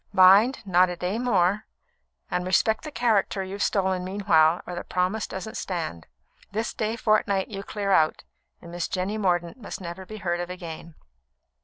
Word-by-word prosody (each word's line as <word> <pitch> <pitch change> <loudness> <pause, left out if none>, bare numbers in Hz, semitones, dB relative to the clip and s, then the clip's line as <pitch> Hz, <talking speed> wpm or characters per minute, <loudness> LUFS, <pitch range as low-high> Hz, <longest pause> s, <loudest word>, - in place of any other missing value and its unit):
Mind, 200 +6 +6
not 185 -1 +4
a 180 - -3
day 180 +5 -2
more; 205 -4 +1 0.6
and 180 - 0
respect 205 +4 +2
the 305 - -6
character 220 -5 +1
you've 195 +2 -6
stolen 190 -2 +1
meanwhile, 175 -4 +3
or 180 - -6
the 175 - -5
promise 185 +4 -1
doesn't 190 +3 -6
stand. 160 - -4 0.4
This 220 +2 -2
day 220 +1 -2
fortnight 215 -4 +1
you 195 -3 -5
clear 200 0 -3
out, 155 -4 +3 0.4
and 170 - -10
Miss 175 0 -3
Jenny 195 +4 -2
Mordaunt 175 -2 0
must 225 - -7
never 180 +1 -7
be 215 - -8
heard 175 -4 -2
of 175 0 -4
again." 170 -2 -8
190 Hz, 170 wpm, -25 LUFS, 175-210 Hz, 0.6 s, Mind